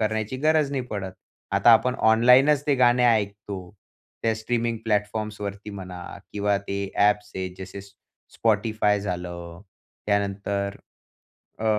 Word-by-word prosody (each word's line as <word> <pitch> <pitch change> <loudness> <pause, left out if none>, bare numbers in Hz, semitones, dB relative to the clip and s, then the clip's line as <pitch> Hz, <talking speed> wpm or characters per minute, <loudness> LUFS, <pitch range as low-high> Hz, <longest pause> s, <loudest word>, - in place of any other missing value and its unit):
करण्याची 110 +2 -1
गरज 155 -2 +3
नाही 135 -2 -1
पडत. 95 -3 -4 0.4
आता 100 +4 +5
आपण 115 +3 +4 0.2
ऑनलाईनच 130 +6 +5
ते 145 - +3
गाणे 125 -1 +4
ऐकतो. 105 -3 0 0.7
त्या 115 -1 +2
स्ट्रीमिंग 115 0 -1
प्लॅटफॉर्म्सवरती 105 -1 -2
म्हणा 90 -3 -8 0.3
किंवा 100 0 +1
ते 100 0 -3 0.2
ॲप्स 105 0 +2
आहेत 95 -1 -4
जसे 95 +1 -8 0.6
Spotify 110 -1 +2
झालं 90 -3 -6 0.5
त्यानंतर, 100 -1 -1 0.8
अ, 110 - -5
105 Hz, 115 wpm, -25 LUFS, 100-115 Hz, 0.8 s, आता